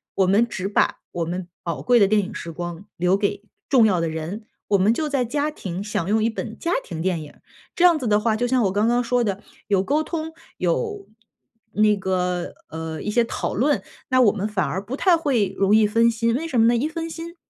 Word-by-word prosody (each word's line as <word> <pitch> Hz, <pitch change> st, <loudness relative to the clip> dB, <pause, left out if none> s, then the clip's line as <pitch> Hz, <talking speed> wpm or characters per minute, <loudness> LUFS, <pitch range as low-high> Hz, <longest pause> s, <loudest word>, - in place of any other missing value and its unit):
我 190 Hz, -, +3 dB
们 210 Hz, +5 st, +3 dB
只 190 Hz, -4 st, -4 dB
把 205 Hz, -, +1 dB
我 170 Hz, -1 st, -2 dB
们 175 Hz, +2 st, -4 dB, 0.2 s
宝 170 Hz, -, -3 dB
贵 245 Hz, -1 st, +4 dB
的 200 Hz, -, +5 dB
电 210 Hz, +1 st, +3 dB
影 200 Hz, +3 st, -7 dB
时 170 Hz, -, -6 dB
光 175 Hz, +2 st, -6 dB
留 180 Hz, +3 st, +2 dB
给 200 Hz, 0 st, -2 dB, 0.2 s
重 255 Hz, -6 st, +5 dB
要 190 Hz, -5 st, +2 dB
的 165 Hz, -, 0 dB
人， 160 Hz, +7 st, -5 dB, 0.3 s
我 205 Hz, -, +4 dB
们 200 Hz, +4 st, +3 dB
就 305 Hz, +4 st, -2 dB
在 275 Hz, -3 st, 0 dB
家 290 Hz, +5 st, -1 dB
庭 190 Hz, -, -5 dB
享 205 Hz, -5 st, -2 dB
用 215 Hz, +2 st, +2 dB
一 225 Hz, -, +2 dB
本 225 Hz, 0 st, -6 dB
家 335 Hz, -, -2 dB
庭 165 Hz, -3 st, -6 dB
电 180 Hz, -2 st, 0 dB
影。 145 Hz, -, -12 dB, 0.4 s
这 350 Hz, -, +1 dB
样 345 Hz, -3 st, +6 dB
子 255 Hz, -, -3 dB
的 210 Hz, -1 st, +3 dB
话， 220 Hz, 0 st, +1 dB
就 245 Hz, +2 st, 0 dB
像 255 Hz, -1 st, +2 dB
我 195 Hz, -, +1 dB
刚 205 Hz, +3 st, +1 dB
刚 240 Hz, +1 st, +2 dB
说 245 Hz, +1 st, +1 dB
的， 200 Hz, -2 st, -2 dB, 0.3 s
有 195 Hz, -2 st, +2 dB
沟 290 Hz, +9 st, +1 dB
通， 320 Hz, 0 st, -4 dB, 0.3 s
有 415 Hz, -4 st, -1 dB, 0.7 s
那 210 Hz, 0 st, +4 dB
个， 180 Hz, -2 st, -1 dB, 0.2 s
呃， 160 Hz, 0 st, -5 dB
一 -, -, -4 dB
些 235 Hz, +2 st, +3 dB
讨 230 Hz, -, -3 dB
论， 250 Hz, -1 st, +1 dB, 0.3 s
那 255 Hz, -, +3 dB
我 220 Hz, -5 st, +6 dB
们 210 Hz, -1 st, -3 dB
反 205 Hz, -4 st, -1 dB
而 190 Hz, +2 st, -3 dB
不 235 Hz, +6 st, -5 dB
太 365 Hz, +1 st, +4 dB
会 240 Hz, -, 0 dB
容 200 Hz, +2 st, +4 dB
易 220 Hz, -1 st, +5 dB
分 230 Hz, +2 st, +3 dB
心， 230 Hz, 0 st, 0 dB
为 320 Hz, +6 st, -2 dB
什 255 Hz, -7 st, 0 dB
么 225 Hz, -, +6 dB
呢？ 240 Hz, -, +4 dB
一 245 Hz, +6 st, 0 dB
分 330 Hz, 0 st, -4 dB
心， 330 Hz, +1 st, -8 dB
215 Hz, 255 characters per minute, -23 LUFS, 190-250 Hz, 0.7 s, 样